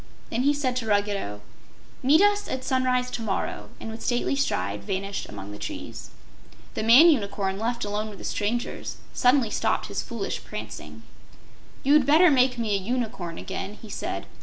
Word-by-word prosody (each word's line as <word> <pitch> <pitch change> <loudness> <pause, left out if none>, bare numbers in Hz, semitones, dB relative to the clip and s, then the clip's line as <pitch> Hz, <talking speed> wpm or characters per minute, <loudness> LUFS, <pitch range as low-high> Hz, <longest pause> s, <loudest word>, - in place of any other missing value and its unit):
Then 230 - 0
he 285 +3 +4
said 260 -3 -1
to 230 -3 -3
Ruggedo: 200 - 0 0.6
"Meet 295 +7 +5
us 410 0 +3
at 260 - -3
sunrise 255 -1 +1
to - - -4
morrow," 210 -4 -3
and 225 - -6
with 225 - -8
stately 245 +2 +1
stride 100 - -1
vanished 195 - -3
among 100 +1 -8
the 105 - -8
trees. - - -7 0.6
The - - -2
man 240 +9 +8
unicorn, 200 -6 -1
left 235 0 -1
alone 210 +1 -2
with 205 - -10
the - - -11
strangers, 230 +4 -2 0.2
suddenly 250 -3 +3
stopped - - 0
his - - -2
foolish - - -4
prancing. - - -8 0.8
"You'd 280 -1 +5
better 320 +4 +7
make 255 -2 +3
me 225 -3 0
a 200 - +2
Unicorn 215 -6 -3
again," 195 +1 -5
he 220 - -11
said. - - -4
230 Hz, 170 wpm, -26 LUFS, 200-255 Hz, 0.8 s, man